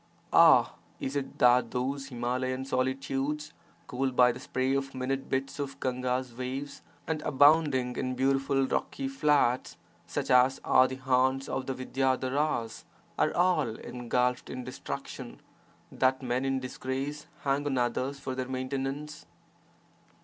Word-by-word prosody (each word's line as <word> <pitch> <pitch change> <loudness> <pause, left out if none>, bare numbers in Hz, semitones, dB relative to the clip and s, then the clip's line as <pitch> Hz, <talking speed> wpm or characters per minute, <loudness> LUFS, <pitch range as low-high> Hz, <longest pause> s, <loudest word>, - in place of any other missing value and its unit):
Ah! - - +7 0.3
is 135 - -4
it 140 -1 -3
that 125 -1 +5
those 135 +2 -2
Himalayan 130 +1 -2
solitudes, 135 +3 -2 0.3
cooled 130 0 -2
by 125 0 +6
the 125 - -8
spray 130 +1 -1
of 135 0 -2
minute 135 +1 -2
bits 135 +2 -2
of 140 -1 -4
Gahga's 125 -1 -2
waves 130 +3 -5 0.2
and 155 -1 -2
abounding 145 -3 +4
in 130 -1 -2
beautiful 135 +1 +2
rocky 270 - -2
flats 145 - +1 0.3
such - - -2
as 125 +1 +5
are 130 - +5
the 130 - -5
haunts 130 +1 +1
of 130 - -3
the 135 - -2
Vidyadharas, 130 -2 -1 0.4
are 155 - +3
all 170 -10 +2
engulfed 125 +1 -1
in 130 -1 -5
destruction, 120 - -7 0.5
that 130 +1 +1
men 125 +1 -1
in 135 0 0
disgrace 135 +3 -4
hang 140 +1 0
on 135 -2 0
others 130 +3 -1
for 135 -1 -4
their 130 0 -3
maintenance? 135 - -4
130 Hz, 135 wpm, -29 LUFS, 125-140 Hz, 0.5 s, Ah